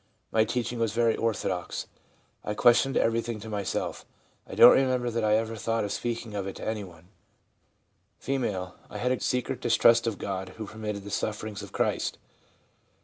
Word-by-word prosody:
My 110 Hz, 0 st, +3 dB
teach 120 Hz, +1 st, -2 dB
ing 120 Hz, -, -5 dB
was 115 Hz, -2 st, 0 dB
very 115 Hz, -1 st, +3 dB
orthodox; 95 Hz, -5 st, -2 dB, 0.6 s
I 105 Hz, -, -3 dB
questioned 125 Hz, +3 st, +4 dB
everything 115 Hz, 0 st, 0 dB
to 110 Hz, -, -8 dB
myself; 100 Hz, -2 st, -3 dB, 0.4 s
I -, -, -7 dB
don't -, -, +10 dB
remember 130 Hz, -2 st, +2 dB
that 115 Hz, 0 st, -1 dB
I 105 Hz, 0 st, +4 dB
ever 115 Hz, +1 st, -1 dB
thought 115 Hz, +1 st, -1 dB
of 100 Hz, -, -3 dB
speak 120 Hz, 0 st, -3 dB
ing 110 Hz, -, -10 dB
of 100 Hz, -2 st, -3 dB
it 95 Hz, -, -5 dB
to -, -, -7 dB
anyone/ 95 Hz, -6 st, -6 dB, 1.1 s
F. 105 Hz, -9 st, -2 dB
' -, -, -27 dB
I -, -, -7 dB
had 125 Hz, +1 st, 0 dB
a 130 Hz, -, 0 dB
secret 125 Hz, -1 st, -1 dB
distrust 115 Hz, 0 st, +4 dB
of 110 Hz, -3 st, -1 dB
God 95 Hz, -1 st, -4 dB
who 110 Hz, -, -5 dB
permitted 105 Hz, -1 st, -5 dB
the 100 Hz, -, -8 dB
sufferings 105 Hz, 0 st, -3 dB
of 100 Hz, -, -9 dB
Christ.' -, -, -1 dB
110 Hz, 185 wpm, -28 LUFS, 100-115 Hz, 1.1 s, don't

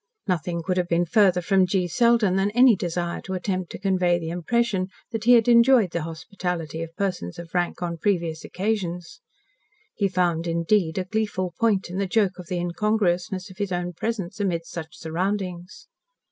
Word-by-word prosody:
Nothing 170 Hz, -2 st, -1 dB
could 185 Hz, +1 st, -1 dB
have 180 Hz, -1 st, +1 dB
been 170 Hz, 0 st, +2 dB
farther 185 Hz, -1 st, +3 dB
from 190 Hz, 0 st, +3 dB
G. 180 Hz, -1 st, 0 dB
Selden 230 Hz, 0 st, +3 dB
than 195 Hz, +1 st, +2 dB
any 245 Hz, -2 st, +7 dB
desire 175 Hz, -1 st, -3 dB
to 190 Hz, -, -5 dB
attempt 185 Hz, -1 st, -3 dB
to -, -, -6 dB
convey 185 Hz, -3 st, +2 dB
the 165 Hz, -1 st, -5 dB
impression 190 Hz, +2 st, 0 dB, 0.2 s
that 225 Hz, -1 st, -4 dB
he 245 Hz, -, +7 dB
had 230 Hz, -1 st, +5 dB
enjoyed 235 Hz, -4 st, +5 dB
the 170 Hz, -, -2 dB
hospitality 165 Hz, 0 st, -4 dB
of 165 Hz, 0 st, -7 dB
persons 185 Hz, -, -3 dB
of 170 Hz, -1 st, -10 dB
rank 175 Hz, 0 st, -1 dB
on 170 Hz, -1 st, -3 dB
previous 170 Hz, -5 st, -1 dB
occasions. 185 Hz, -, -3 dB, 0.7 s
He 200 Hz, -, +1 dB
found 175 Hz, -3 st, 0 dB
indeed 170 Hz, +1 st, +1 dB
a 185 Hz, -, -1 dB
gleeful 185 Hz, -3 st, -2 dB
point 205 Hz, -6 st, +1 dB
in 185 Hz, -, -3 dB
the 200 Hz, -, 0 dB
joke 195 Hz, -2 st, +1 dB
of 180 Hz, -, -9 dB
the 180 Hz, -, -2 dB
incongruousness 185 Hz, +1 st, -1 dB
of 185 Hz, -, -16 dB
his 200 Hz, -2 st, -2 dB
own 175 Hz, 0 st, -2 dB
presence 205 Hz, 0 st, -4 dB
amid 175 Hz, -5 st, -1 dB
such 160 Hz, -2 st, -8 dB
surroundings. 185 Hz, +5 st, -4 dB
185 Hz, 180 wpm, -24 LUFS, 170-205 Hz, 0.7 s, any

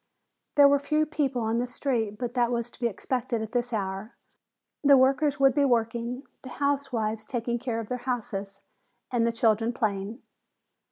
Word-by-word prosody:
There 285 Hz, -1 st, +8 dB
were 285 Hz, 0 st, +4 dB
few 305 Hz, +2 st, +1 dB
people 280 Hz, -6 st, -1 dB
on 225 Hz, +1 st, 0 dB
the 245 Hz, -, -1 dB
street, 235 Hz, -5 st, -1 dB
but 245 Hz, 0 st, -4 dB
that 245 Hz, -1 st, +2 dB
was 235 Hz, 0 st, -2 dB
to -, -, -18 dB
be 240 Hz, -, +2 dB
expected 235 Hz, +1 st, -2 dB
at 220 Hz, -, -7 dB
this 245 Hz, 0 st, -1 dB
hour. 195 Hz, +1 st, -3 dB, 0.7 s
The 280 Hz, -1 st, +7 dB
workers 275 Hz, +2 st, +3 dB
would 270 Hz, -1 st, +5 dB
be 285 Hz, -, +3 dB
working, 235 Hz, 0 st, 0 dB, 0.2 s
the 260 Hz, -, -9 dB
housewives 250 Hz, -7 st, -1 dB
taking 235 Hz, +1 st, -2 dB
care 235 Hz, -2 st, -2 dB
of 225 Hz, -, -5 dB
their 250 Hz, +2 st, -3 dB
houses 210 Hz, -6 st, -4 dB, 0.5 s
and 235 Hz, -2 st, +2 dB
the -, -, +2 dB
children 225 Hz, 0 st, +2 dB
playing. 215 Hz, 0 st, -2 dB
240 Hz, 175 wpm, -27 LUFS, 225-265 Hz, 0.7 s, There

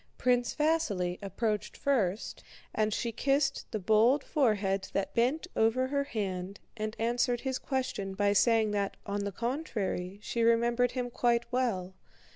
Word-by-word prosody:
Prince 245 Hz, -1 st, +1 dB
Vasíli 240 Hz, -, 0 dB
approached 210 Hz, +2 st, -2 dB
first, 220 Hz, -8 st, 0 dB, 0.3 s
and 215 Hz, 0 st, +1 dB
she 235 Hz, +3 st, -1 dB
kissed 275 Hz, +4 st, 0 dB
the -, -, -2 dB
bold 220 Hz, +8 st, +3 dB
forehead 205 Hz, -, +1 dB
that 195 Hz, -, -1 dB
bent 255 Hz, +9 st, +1 dB
over 225 Hz, +4 st, +3 dB
her 280 Hz, 0 st, 0 dB
hand 195 Hz, -5 st, -4 dB, 0.2 s
and 215 Hz, 0 st, -4 dB
answered 240 Hz, +1 st, +1 dB
his 260 Hz, -1 st, -2 dB
question 230 Hz, -8 st, -3 dB
by 205 Hz, 0 st, +2 dB
saying 220 Hz, 0 st, +3 dB
that, 200 Hz, -1 st, -1 dB
on 200 Hz, 0 st, -2 dB
the 200 Hz, -, -2 dB
contrary, 210 Hz, -, -3 dB
she 235 Hz, -, -2 dB
remembered 235 Hz, +1 st, +3 dB
him 245 Hz, -2 st, -3 dB
quite 235 Hz, -1 st, +2 dB
well. 215 Hz, -8 st, -1 dB
230 Hz, 145 wpm, -30 LUFS, 200-250 Hz, 0.3 s, bold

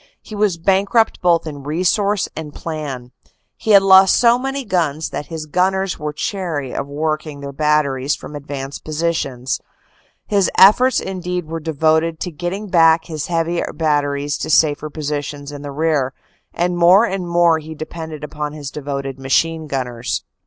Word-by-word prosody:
He -, -, -11 dB
was 205 Hz, -4 st, +1 dB
bankrupt 195 Hz, +6 st, +2 dB
both 170 Hz, -2 st, +3 dB
in 145 Hz, -3 st, -7 dB
resources 185 Hz, +7 st, 0 dB
and 150 Hz, -2 st, -7 dB
plan; 140 Hz, -6 st, -6 dB, 0.4 s
he -, -, -7 dB
had 200 Hz, -2 st, +7 dB
lost 190 Hz, 0 st, +7 dB
so 240 Hz, 0 st, +4 dB
many 270 Hz, +1 st, -3 dB
guns 160 Hz, -6 st, -1 dB
that 145 Hz, -, -5 dB
his 160 Hz, -2 st, -6 dB
gunners 190 Hz, +4 st, 0 dB
were 150 Hz, 0 st, -3 dB
chary 160 Hz, -, -3 dB
of 140 Hz, -, -3 dB
working 155 Hz, 0 st, -3 dB
their 140 Hz, 0 st, -6 dB
batteries 140 Hz, -2 st, +1 dB
from 150 Hz, -, -10 dB
advanced 140 Hz, -1 st, -6 dB
positions; 150 Hz, -5 st, -2 dB, 0.6 s
his 200 Hz, -3 st, +2 dB
efforts 250 Hz, +7 st, +6 dB
indeed 180 Hz, -2 st, -4 dB
were 165 Hz, +1 st, -5 dB
de 160 Hz, +1 st, -4 dB
voted 160 Hz, +2 st, +2 dB
to 180 Hz, -, -3 dB
getting 180 Hz, +6 st, -4 dB
back 165 Hz, -3 st, +4 dB
his 155 Hz, -3 st, -5 dB
heavy 170 Hz, 0 st, 0 dB
batteries 145 Hz, -2 st, 0 dB
to -, -, -4 dB
safer 155 Hz, -1 st, +3 dB
positions 145 Hz, -1 st, -4 dB
in 145 Hz, -1 st, -8 dB
the 145 Hz, -, -6 dB
rear, 145 Hz, -3 st, 0 dB, 0.4 s
and 175 Hz, 0 st, -1 dB
more 185 Hz, +6 st, +6 dB
and 190 Hz, -5 st, -3 dB
more 170 Hz, -1 st, +4 dB
he 160 Hz, +1 st, -9 dB
depended 155 Hz, -1 st, -7 dB
upon 150 Hz, 0 st, -5 dB
his 145 Hz, -2 st, -7 dB
devoted 140 Hz, -2 st, -5 dB
machine 160 Hz, +4 st, 0 dB
gunners. 125 Hz, -4 st, -3 dB
160 Hz, 160 wpm, -19 LUFS, 145-180 Hz, 0.6 s, had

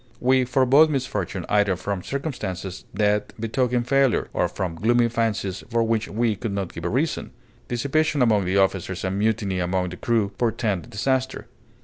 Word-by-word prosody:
We 130 Hz, 0 st, +3 dB
forebode 135 Hz, +5 st, +5 dB
misfortune 105 Hz, -, -2 dB
either 105 Hz, -2 st, +2 dB
from 100 Hz, +1 st, -3 dB
circumstances 95 Hz, -, -5 dB
that 105 Hz, +1 st, 0 dB
betoken 120 Hz, +2 st, 0 dB
failure, 135 Hz, -1 st, +2 dB
or -, -, +1 dB
from 95 Hz, -4 st, -4 dB
gloomy 115 Hz, +7 st, +2 dB
fancies 110 Hz, -5 st, -1 dB
for 115 Hz, -1 st, +2 dB
which 115 Hz, -1 st, 0 dB
we 115 Hz, 0 st, 0 dB
could 110 Hz, -1 st, -4 dB
not 100 Hz, -3 st, -3 dB
give 85 Hz, -, -7 dB
a -, -, +1 dB
reason. 145 Hz, -, -1 dB, 0.4 s
Dissipation 140 Hz, +3 st, +1 dB
among 105 Hz, -5 st, +3 dB
the 95 Hz, +2 st, +1 dB
officers 95 Hz, -1 st, 0 dB
and 95 Hz, +1 st, -1 dB
mutiny 105 Hz, -3 st, 0 dB
among 90 Hz, +1 st, 0 dB
the 90 Hz, -, -8 dB
crew 115 Hz, -4 st, +1 dB
portend 110 Hz, -7 st, -1 dB
disaster. 130 Hz, +5 st, -1 dB
110 Hz, 160 wpm, -24 LUFS, 95-125 Hz, 0.4 s, forebode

